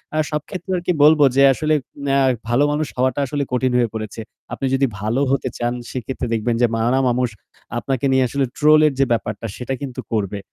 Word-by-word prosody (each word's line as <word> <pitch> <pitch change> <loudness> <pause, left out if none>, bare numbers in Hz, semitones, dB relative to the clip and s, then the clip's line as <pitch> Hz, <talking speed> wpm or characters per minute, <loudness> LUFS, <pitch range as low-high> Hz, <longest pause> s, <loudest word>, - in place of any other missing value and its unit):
আর 155 - +2
সব 150 -1 -1
ক্ষেত্রে 185 0 -6
আর - - -3
কি 180 - +3
বলব 155 0 +6 0.2
যে 140 - +5
আসলে 155 +3 0 0.3
না, 135 0 +2 0.3
ভালো 125 +5 +3
মানুষ 150 -1 -1
হওয়াটা 130 +2 +1
আসলে 145 +1 -2
কঠিন 125 0 +1
হয়ে 120 -2 +2
পড়েছে। 110 0 -5 0.3
আপনি 135 - -3
যদি 135 +1 +3
ভালো 110 +6 -1
হতে 135 -1 0
চান 120 0 -1 0.2
সেক্ষেত্রে 130 0 -4
দেখবেন 115 +1 0
যে 120 - +5
নানা 120 +4 +1
মানুষ 125 0 +1 0.5
আপনাকে 135 -1 -2
নিয়ে 130 -1 +3
আসলে 140 +2 0
ট্রোল 155 +1 +5
এর 145 - 0
যে 135 - +4
ব্যাপারটা 115 0 -2
সেটা 130 +2 -4
কিন্তু 130 -3 -5
করবে। 105 -2 -1
130 Hz, 205 wpm, -20 LUFS, 120-140 Hz, 0.5 s, বলব